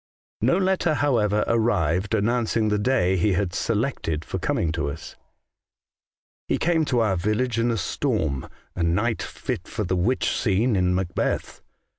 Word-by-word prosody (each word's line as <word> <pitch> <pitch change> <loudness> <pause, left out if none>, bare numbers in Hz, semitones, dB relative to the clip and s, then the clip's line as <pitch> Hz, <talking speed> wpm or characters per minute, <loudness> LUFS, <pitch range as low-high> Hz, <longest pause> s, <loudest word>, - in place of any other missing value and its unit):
No 130 - +3
letter, 185 -4 +1
however, 110 -8 +2
arrived 105 -4 +1
announcing 110 0 +1
the 105 0 +1
day 105 -5 +2
he 95 +3 +2
had 90 -1 -1
selected 105 - -1
for - - -4
coming 80 - 0
to 75 -3 -2
us. 75 +2 -8 0.6
" - - -73
He - - +1
came 160 -2 +1
to 125 -5 +1
our 105 -4 +2
village 110 +6 0
in 115 +1 +2
a 115 - 0
storm 90 - -1
— - - -40
a 90 - -3
night 105 +8 +1
fit - - -5
for - - -3
the 95 - -1
witch 105 +9 +1
scene 110 +2 +1
in 90 -1 +2
Macbeth. 90 -1 -2
105 Hz, 165 wpm, -24 LUFS, 90-120 Hz, 0.6 s, No